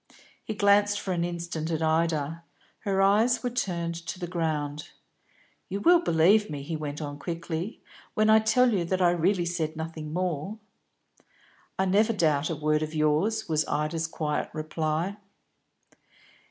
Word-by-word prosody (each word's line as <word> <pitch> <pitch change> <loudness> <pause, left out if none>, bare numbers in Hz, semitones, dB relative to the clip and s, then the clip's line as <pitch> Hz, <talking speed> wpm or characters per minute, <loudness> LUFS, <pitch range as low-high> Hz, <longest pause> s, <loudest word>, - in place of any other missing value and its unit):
He 220 - -5
glanced 205 0 +4
for 190 - -4
an 170 -1 0
instant 170 -2 -4
at 160 -1 -1
Ida; 160 0 0 0.4
her 195 -2 +1
eyes 220 +5 +3
were 245 - -1
turned 175 -8 -2
to 165 - -4
the 180 - -4
ground. 155 -4 -3 0.8
"You 195 - -2
will 345 +10 +6
believe 200 - +4
me," 145 -2 -5
he 160 +3 -4
went 150 0 -5
on 145 0 -6
quickly, 170 - -5 0.3
"when 215 0 +3
I 220 0 +7
tell 240 +2 +3
you 185 -4 +1
that 185 +2 -1
I 175 -2 +4
really 175 +1 +1
said 165 -2 -2
nothing 160 -1 -6
more?" 180 +3 -2 1.2
"I 190 - +2
never 210 +4 +3
doubt 155 -6 +1
a 165 - -1
word 155 0 +1
of 155 0 -4
yours," 155 +9 +1
was 155 -2 +1
Ida's 155 +2 -1
quiet 155 -2 -2
reply. 155 +4 -2
170 Hz, 155 wpm, -27 LUFS, 155-195 Hz, 1.2 s, I